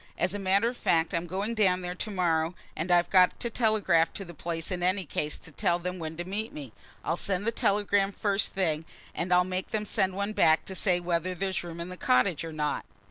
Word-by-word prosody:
As 180 Hz, +1 st, 0 dB
a 205 Hz, -, -3 dB
matter 195 Hz, +3 st, +2 dB
of 245 Hz, +1 st, -3 dB
fact, 165 Hz, 0 st, +1 dB
I'm 170 Hz, +1 st, -1 dB
going 195 Hz, +6 st, -2 dB
down 190 Hz, -5 st, +2 dB
there 180 Hz, 0 st, -4 dB
to 200 Hz, +4 st, -4 dB
morrow, 170 Hz, -3 st, 0 dB, 0.2 s
and 165 Hz, +4 st, -3 dB
I've 175 Hz, 0 st, +3 dB
got 185 Hz, -1 st, +5 dB
to 235 Hz, -, -2 dB
telegraph 210 Hz, -8 st, +2 dB
to 195 Hz, -, -6 dB
my 170 Hz, -, -9 dB
place 165 Hz, +1 st, -4 dB
in 180 Hz, -1 st, -2 dB
any 185 Hz, +1 st, +1 dB
case 150 Hz, 0 st, -2 dB
to 165 Hz, -, -11 dB
tell 170 Hz, +3 st, +1 dB
them 180 Hz, +1 st, -5 dB
when 160 Hz, -1 st, -5 dB
to 175 Hz, -, -3 dB
meet 210 Hz, +4 st, -3 dB
me. 135 Hz, -7 st, -9 dB, 0.3 s
I'll 165 Hz, -, +1 dB
send 195 Hz, +2 st, -2 dB
the 230 Hz, -, +2 dB
telegram 200 Hz, -2 st, +2 dB
first 200 Hz, 0 st, 0 dB
thing, 165 Hz, -4 st, 0 dB, 0.3 s
and 180 Hz, +2 st, -3 dB
I'll 180 Hz, 0 st, +6 dB
make 185 Hz, 0 st, -3 dB
them 210 Hz, -1 st, -2 dB
send 190 Hz, -2 st, 0 dB
one 200 Hz, +2 st, -2 dB
back 160 Hz, -5 st, +4 dB
to 190 Hz, -, -5 dB
say 185 Hz, -2 st, +2 dB
whether 175 Hz, +1 st, -1 dB
there's 190 Hz, 0 st, -2 dB
room 170 Hz, -1 st, -7 dB
in 170 Hz, +1 st, -5 dB
the 180 Hz, -, -8 dB
cottage 125 Hz, +5 st, +2 dB
or 165 Hz, -, -5 dB
not." 150 Hz, -1 st, -2 dB
180 Hz, 240 wpm, -28 LUFS, 170-195 Hz, 0.3 s, I'll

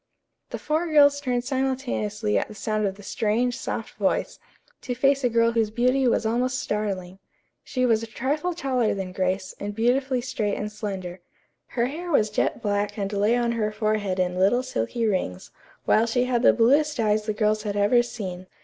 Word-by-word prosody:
The -, -, -4 dB
four 315 Hz, +3 st, -1 dB
girls 285 Hz, -2 st, +5 dB
turned 250 Hz, -3 st, -1 dB
simultaneously 250 Hz, -5 st, -1 dB
at -, -, +1 dB
the 215 Hz, -, -11 dB
sound 215 Hz, +1 st, -1 dB
of 195 Hz, -, -4 dB
the 205 Hz, -, -14 dB
strange, 235 Hz, +4 st, 0 dB
soft -, -, -5 dB
voice, -, -, 0 dB, 0.4 s
to 245 Hz, -, -4 dB
face 275 Hz, +2 st, +2 dB
a 245 Hz, -, +3 dB
girl 230 Hz, 0 st, +3 dB
whose 225 Hz, -2 st, +1 dB
beauty 250 Hz, +4 st, +2 dB
was 230 Hz, -, +1 dB
almost 250 Hz, +3 st, 0 dB
startling. 195 Hz, -6 st, -3 dB, 0.4 s
She 255 Hz, -1 st, -1 dB
was 225 Hz, -3 st, +3 dB
a 230 Hz, -, -6 dB
trifle 295 Hz, +10 st, -2 dB
taller 255 Hz, -9 st, 0 dB
than 190 Hz, -2 st, -4 dB
Grace 185 Hz, 0 st, -2 dB
and 205 Hz, 0 st, -5 dB
beautifully 255 Hz, +3 st, +1 dB
straight 220 Hz, -4 st, -2 dB
and 210 Hz, 0 st, -4 dB
slender. 190 Hz, -4 st, -5 dB, 0.5 s
Her 235 Hz, -1 st, 0 dB
hair 325 Hz, +7 st, -5 dB
was 215 Hz, -9 st, +2 dB
jet 220 Hz, -, -1 dB
black 205 Hz, 0 st, -1 dB
and 200 Hz, 0 st, -3 dB
lay 205 Hz, +3 st, +2 dB
on 240 Hz, -1 st, +1 dB
her 215 Hz, -2 st, -1 dB
forehead 215 Hz, -3 st, -1 dB
in 180 Hz, 0 st, 0 dB
little 220 Hz, +7 st, +3 dB
silky 235 Hz, -, -2 dB
rings, 185 Hz, -, -2 dB, 0.3 s
while 225 Hz, +2 st, +3 dB
she 245 Hz, +2 st, +1 dB
had 250 Hz, -2 st, 0 dB
the -, -, +7 dB
bluest 285 Hz, +5 st, +3 dB
eyes 215 Hz, -1 st, +1 dB
the 215 Hz, -, 0 dB
girls 215 Hz, 0 st, +1 dB
had 205 Hz, -1 st, -3 dB
ever 205 Hz, +4 st, +4 dB
seen. 185 Hz, -6 st, -6 dB
225 Hz, 190 wpm, -25 LUFS, 205-255 Hz, 0.5 s, the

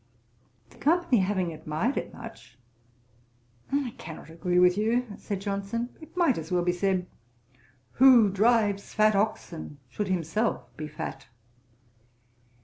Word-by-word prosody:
The -, -, -19 dB
company 320 Hz, -6 st, +3 dB
having 185 Hz, -3 st, 0 dB
admired 155 Hz, -, -2 dB
it -, -, -3 dB
much, 120 Hz, +1 st, -12 dB, 1.1 s
'I 275 Hz, -4 st, 0 dB
cannot 160 Hz, 0 st, -9 dB
agree 175 Hz, +2 st, -1 dB
with 180 Hz, 0 st, +6 dB
you 225 Hz, +4 st, +1 dB
(said 200 Hz, -2 st, -4 dB
Johnson:) 200 Hz, +4 st, -3 dB
It 315 Hz, -, -14 dB
might 330 Hz, -, +3 dB
as 160 Hz, +1 st, -8 dB
well 180 Hz, -1 st, +2 dB
be 175 Hz, -, +2 dB
said, 185 Hz, 0 st, 0 dB, 0.9 s
'Who 245 Hz, -6 st, +7 dB
drives 205 Hz, -1 st, +2 dB
fat 215 Hz, -1 st, +4 dB
oxen 190 Hz, -7 st, -2 dB
should 205 Hz, +9 st, -3 dB
himself 185 Hz, +5 st, -1 dB
be 155 Hz, -, -5 dB
fat.' 135 Hz, -2 st, -7 dB
200 Hz, 130 wpm, -27 LUFS, 175-230 Hz, 1.1 s, Who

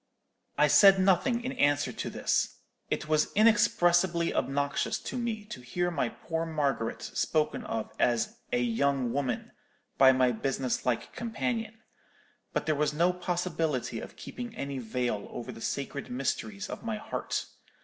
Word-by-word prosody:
"I 150 Hz, -, +6 dB
said 195 Hz, +6 st, +8 dB
nothing 195 Hz, +6 st, +3 dB
in 255 Hz, -, -2 dB
answer 145 Hz, -, +2 dB
to -, -, -4 dB
this. -, -, 0 dB, 0.3 s
It -, -, -2 dB
was 155 Hz, -1 st, +2 dB
inexpressibly 180 Hz, -5 st, +4 dB
obnoxious 140 Hz, +2 st, 0 dB
to -, -, -6 dB
me 230 Hz, -4 st, -2 dB
to 210 Hz, -11 st, -8 dB
hear 175 Hz, +8 st, -1 dB
my 140 Hz, -7 st, 0 dB
poor 165 Hz, +5 st, -4 dB
Margaret 145 Hz, -8 st, -1 dB
spoken 155 Hz, -1 st, 0 dB
of 110 Hz, -1 st, -3 dB
as 120 Hz, -2 st, +1 dB
'a 120 Hz, -, +2 dB
young 125 Hz, +1 st, +1 dB
woman' 135 Hz, -4 st, -2 dB, 0.5 s
by 135 Hz, -1 st, +9 dB
my 130 Hz, -1 st, +3 dB
business 130 Hz, +2 st, -2 dB
like 120 Hz, -2 st, -1 dB
companion. 225 Hz, -1 st, -3 dB, 0.7 s
But -, -, -1 dB
there 155 Hz, -, +2 dB
was 150 Hz, 0 st, 0 dB
no 175 Hz, +3 st, +3 dB
possibility 165 Hz, -9 st, -1 dB
of -, -, -9 dB
keeping 240 Hz, -2 st, -7 dB
any 140 Hz, -6 st, -4 dB
veil 120 Hz, -3 st, -2 dB
over 120 Hz, -, -6 dB
the 115 Hz, -, -11 dB
sacred 140 Hz, +2 st, -3 dB
mysteries 185 Hz, +11 st, -2 dB
of -, -, -6 dB
my 225 Hz, -2 st, -3 dB
heart. -, -, -3 dB
150 Hz, 150 wpm, -29 LUFS, 130-190 Hz, 0.7 s, by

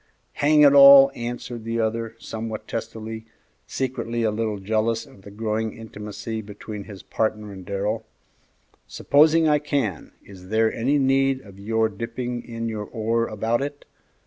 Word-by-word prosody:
"Hang 150 Hz, +1 st, +5 dB
it 145 Hz, -1 st, +7 dB
all!" 140 Hz, -1 st, +9 dB
answered 120 Hz, -1 st, -6 dB
the 115 Hz, +1 st, -2 dB
other, 115 Hz, 0 st, -2 dB
somewhat 110 Hz, -1 st, -6 dB
testily, 110 Hz, 0 st, -6 dB, 0.4 s
secretly 120 Hz, -3 st, -3 dB
a 110 Hz, -, +2 dB
little 110 Hz, -1 st, -2 dB
jealous 110 Hz, +3 st, -1 dB
of 95 Hz, -, -18 dB
the 100 Hz, -, -12 dB
growing 110 Hz, +1 st, -3 dB
intimacy 105 Hz, 0 st, -6 dB
between 105 Hz, 0 st, -8 dB
his 100 Hz, -3 st, -11 dB
partner 105 Hz, -2 st, -2 dB
and 95 Hz, -1 st, -10 dB
Darrell; 105 Hz, +3 st, -3 dB, 0.8 s
"supposing 160 Hz, +3 st, +4 dB
I 150 Hz, -1 st, +4 dB
can, 135 Hz, -, -2 dB
is 95 Hz, -2 st, -13 dB
there 110 Hz, +1 st, +2 dB
any 135 Hz, +6 st, +1 dB
need 135 Hz, -1 st, +2 dB
of 100 Hz, -4 st, -15 dB
your 110 Hz, +2 st, +1 dB
dipping 120 Hz, +3 st, -5 dB
in 115 Hz, -1 st, -5 dB
your 110 Hz, -2 st, -4 dB
oar 115 Hz, +1 st, -1 dB
about 110 Hz, +3 st, -1 dB
it? 145 Hz, +1 st, -5 dB
115 Hz, 150 wpm, -23 LUFS, 105-125 Hz, 0.8 s, all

